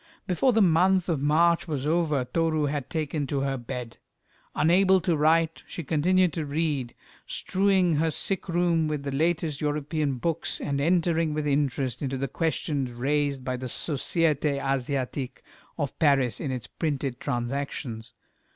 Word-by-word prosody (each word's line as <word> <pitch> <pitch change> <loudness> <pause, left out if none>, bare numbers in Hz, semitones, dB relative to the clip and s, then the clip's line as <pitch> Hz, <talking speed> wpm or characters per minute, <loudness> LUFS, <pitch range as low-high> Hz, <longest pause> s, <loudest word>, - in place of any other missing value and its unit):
Before 185 +9 +2
the 225 -3 +4
month 185 +1 +3
of 155 -5 0
March 165 +4 +3
was 145 -4 -3
over, 155 -4 +1
Toru 160 +2 0
had 145 -2 -3
taken 155 -2 -2
to 140 0 -1
her 135 0 0
bed. 125 -1 -6 0.6
Unable 190 +4 +4
to 175 -1 +1
write, 160 +2 +2
she 170 - -6
continued 180 +4 +2
to 160 - -2
read, 145 -4 -2 0.3
strewing 190 -4 +2
her 160 +2 +2
sick 190 +5 -2
room 170 -2 +2
with 150 -2 -3
the 140 - -3
latest 155 0 0
European 150 -1 -1
books, 165 +5 -2
and 140 -1 -2
entering 165 -1 +2
with 155 -1 -1
interest 140 -3 0
into 135 -2 -2
the 135 +1 -2
questions 145 -3 -1
raised 140 +2 -1
by 130 -1 -1
the 130 +1 -5
Société 150 +1 0
Asiatique 135 -1 -2 0.3
of 145 -3 -3
Paris 140 -6 +3
in 145 - -3
its 130 -3 -4
printed 140 -5 -3
Transactions. 120 -3 -4
150 Hz, 150 wpm, -26 LUFS, 135-165 Hz, 0.6 s, the